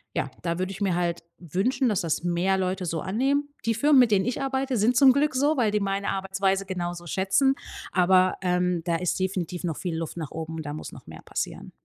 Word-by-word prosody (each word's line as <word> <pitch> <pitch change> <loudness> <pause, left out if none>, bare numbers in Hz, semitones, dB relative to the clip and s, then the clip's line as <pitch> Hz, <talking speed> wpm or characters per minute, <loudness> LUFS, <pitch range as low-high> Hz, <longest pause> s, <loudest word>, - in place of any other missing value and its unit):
ja, - - -1
da 170 0 -2
würde 185 +1 -2
ich 195 - -9
mir 190 -3 +1
halt 170 -1 -1
wünschen, 195 - 0
dass 210 -4 +1
das 165 0 -1
mehr 175 +2 +1
Leute 185 0 -1
so 165 -1 -2
annehmen. 275 +9 0 0.2
Die 230 0 +1
Firmen, 285 +4 +5
mit 245 - +6
denen 190 -2 +3
ich 250 +3 -2
arbeite, 270 -1 -1
sind 225 +4 +3
zum 265 -1 +7
Glück 285 0 +1
so, 290 +4 +2
weil 240 -6 +2
die 210 0 +1
meine 200 0 -1
Arbeitsweise 195 0 0
genauso 175 -2 -4
schätzen, 195 - +2 0.4
aber, 185 0 +4
ähm, 180 -1 +1
da 170 - +1
ist 180 +2 -1
definitiv 185 -2 -2
noch 165 -3 -2
viel 175 -3 -3
Luft 165 +1 -5
nach 155 -4 -5
oben, 160 0 -5
da 145 0 -5
muss 155 - -7
noch - - -12
mehr - - -11
passieren. - - -5
190 Hz, 225 wpm, -26 LUFS, 175-230 Hz, 0.4 s, zum